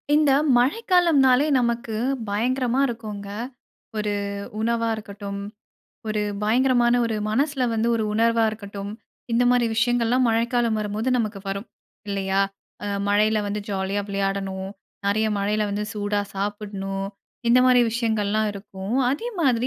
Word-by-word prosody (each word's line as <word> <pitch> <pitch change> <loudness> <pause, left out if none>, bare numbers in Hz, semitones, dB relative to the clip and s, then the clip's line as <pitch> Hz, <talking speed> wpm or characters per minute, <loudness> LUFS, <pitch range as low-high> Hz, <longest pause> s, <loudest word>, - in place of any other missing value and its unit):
இந்த 300 -2 +4 0.3
மழைக்காலம்னாலே 295 - +4
நமக்கு 235 -2 -1 0.3
பயங்கரமா 250 +4 0
இருக்குங்க. 215 -4 -6 0.7
ஒரு 210 -1 -1 0.5
உணவா 230 +1 +1
இருக்கட்டும், 200 -1 -7 0.7
ஒரு 215 -1 0 0.2
பயங்கரமான 240 +2 +3
ஒரு 225 -1 -2
மனசுல 270 +3 +1
வந்து 225 +1 +1
ஒரு 220 - 0
உணர்வா 230 +1 +3
இருக்கட்டும். 200 -1 -7 0.4
இந்த 235 +1 +3
மாதிரி 245 -1 +3
விஷயங்கள்லாம் 240 +2 +2
மழைக்காலம் 230 0 +1
வரும்போது 210 +3 -2
நமக்கு 215 -3 -2
வரும். 195 +3 -3 0.4
இல்லயா! 195 -1 0 0.4
அ - - -3 0.2
மழையில 215 +2 +3
வந்து 205 +1 -2
ஜாலியா 195 0 -1
விளையாடணும். 195 -1 -2 0.4
நிறைய 215 +2 +2
மழையில 210 +2 0
வந்து 205 +1 -2
சூடா 205 -1 -1
சாப்பிட்ணும். 195 -1 -3 0.4
இந்த 240 +2 +6
மாதிரி 250 -1 +6
விஷயங்கள்லாம் 220 -2 0
இருக்கும். 195 +1 -6 0.2
அதே 300 - -2
மாதிரி 250 -5 +2
220 Hz, 120 wpm, -24 LUFS, 200-240 Hz, 0.7 s, இந்த